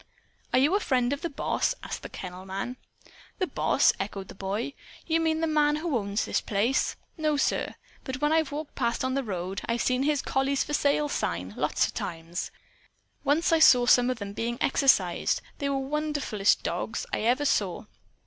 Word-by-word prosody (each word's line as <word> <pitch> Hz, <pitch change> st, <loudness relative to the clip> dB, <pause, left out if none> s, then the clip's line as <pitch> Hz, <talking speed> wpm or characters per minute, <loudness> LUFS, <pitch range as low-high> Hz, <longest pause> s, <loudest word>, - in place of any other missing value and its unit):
"Are -, -, +3 dB
you 285 Hz, +7 st, +4 dB
a 405 Hz, -, +4 dB
friend 255 Hz, -7 st, +1 dB
of 285 Hz, -, -4 dB
the 340 Hz, -, -2 dB
boss?" 285 Hz, -, 0 dB
asked -, -, -5 dB
the -, -, -8 dB
kennel 185 Hz, 0 st, -8 dB
man. 195 Hz, +7 st, -5 dB, 0.6 s
"The 370 Hz, -, +1 dB
boss?" -, -, +3 dB
echoed 195 Hz, -1 st, -5 dB
the -, -, -8 dB
boy. 200 Hz, +8 st, -3 dB, 0.3 s
"You 325 Hz, 0 st, +2 dB
mean 320 Hz, -1 st, +1 dB
the -, -, +2 dB
man 300 Hz, -2 st, +3 dB
who 310 Hz, -1 st, -2 dB
owns 200 Hz, -2 st, -1 dB
this -, -, 0 dB
place? 220 Hz, +6 st, +1 dB, 0.2 s
No, 305 Hz, -1 st, +1 dB
sir. -, -, 0 dB, 0.3 s
But 260 Hz, -1 st, -5 dB
when 295 Hz, +1 st, +2 dB
I've 320 Hz, -3 st, +2 dB
walked 300 Hz, +1 st, -5 dB
past, 235 Hz, +2 st, -1 dB
on 260 Hz, -, 0 dB
the 275 Hz, -, +1 dB
road, 190 Hz, -4 st, -4 dB
I've 235 Hz, 0 st, 0 dB
seen 255 Hz, 0 st, +1 dB
his 290 Hz, 0 st, +1 dB
'Collies 270 Hz, +1 st, +1 dB
for 295 Hz, -, -6 dB
Sale' 290 Hz, +1 st, +2 dB
sign, 90 Hz, -, -2 dB
lots -, -, +1 dB
of -, -, -5 dB
times. 165 Hz, +1 st, -4 dB, 0.7 s
Once 300 Hz, +4 st, +2 dB
I 325 Hz, -, +5 dB
saw 250 Hz, -6 st, +7 dB
some 245 Hz, 0 st, +5 dB
of 255 Hz, -, -1 dB
them 200 Hz, -2 st, -6 dB
being 235 Hz, +2 st, -2 dB
exercised. 270 Hz, 0 st, +3 dB, 0.2 s
They 280 Hz, -2 st, -1 dB
were 280 Hz, -, 0 dB
the 270 Hz, 0 st, -2 dB
wonderfulest 295 Hz, -9 st, +1 dB
dogs -, -, -3 dB
I -, -, +1 dB
ever 250 Hz, +6 st, +2 dB
saw. 200 Hz, -8 st, 0 dB
265 Hz, 195 wpm, -27 LUFS, 205-295 Hz, 0.7 s, saw